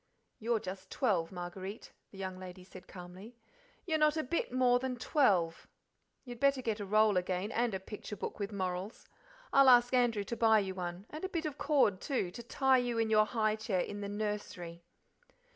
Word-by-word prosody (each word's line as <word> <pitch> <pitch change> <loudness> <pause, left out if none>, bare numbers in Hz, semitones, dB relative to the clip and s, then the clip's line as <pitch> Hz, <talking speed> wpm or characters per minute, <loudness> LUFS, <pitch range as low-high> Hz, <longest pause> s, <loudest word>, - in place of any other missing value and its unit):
"You're 230 0 0
just 185 -1 -7
twelve, 185 -10 0
Marguerite;" 185 +3 -7 0.2
the 195 - -14
young 190 -1 -5
lady 185 0 -9
said 185 0 -13
calmly: 185 +6 -11 0.5
"you're 320 -4 0
not 305 +1 +3
a 315 - 0
bit 295 +2 -2
more 250 -1 +3
than 260 0 -3
twelve. 200 - +1 0.6
You'd 245 -2 -8
better 275 -1 +2
get 225 -2 -1
a 205 - -5
roll 215 -1 +4
again, 185 +3 -1
and 235 -3 0
a - - -2
picture 210 +2 -8
book - - -6
with 200 +1 -3
morals. 185 +1 -4 0.5
I'll 275 -1 +7
ask 245 0 +6
Andrew 240 -5 +2
to 235 - -4
buy 225 -1 +5
you 195 -2 -1
one 180 +1 -5
and 310 +3 -7
a 380 - -2
bit 335 -3 -3
of 295 -2 -4
cord, 265 -11 +2
too, 250 -11 -1
to 235 - -8
tie 265 +2 +3
you 245 -1 -1
in 225 -1 +1
your 215 0 +5
high 215 0 +1
chair 210 -4 -1
in 205 +2 -5
the 200 - -4
nursery." 205 -5 -4
215 Hz, 195 wpm, -33 LUFS, 185-245 Hz, 0.6 s, I'll